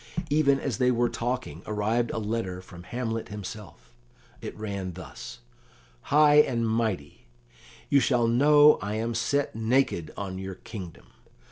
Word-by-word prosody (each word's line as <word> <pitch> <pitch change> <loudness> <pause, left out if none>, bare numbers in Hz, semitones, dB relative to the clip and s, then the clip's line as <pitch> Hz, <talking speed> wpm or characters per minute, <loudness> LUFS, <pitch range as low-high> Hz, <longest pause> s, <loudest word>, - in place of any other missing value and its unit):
Even 140 -2 +3
as 130 -7 -3
they 125 - +4
were 120 -1 +2
talking 120 - -3
arrived 110 +3 0
a - - -4
letter 105 -4 -3
from 90 -1 -12
Hamlet 115 +4 -4
himself; 100 - -9 0.5
it - - -7
ran 100 -4 -4
thus: 70 -8 -10 0.7
"HIGH 150 0 +6
AND 120 -5 -1
MIGHTY, 110 - -2 0.6
"You 140 - +4
shall 120 -1 +2
know 145 +5 +6
I 105 +1 -3
am 115 +2 -2
set 115 +5 0
naked 110 - +1
on 95 -2 -5
your 95 0 -6
kingdom. 95 -3 -10
110 Hz, 140 wpm, -27 LUFS, 95-125 Hz, 0.7 s, HIGH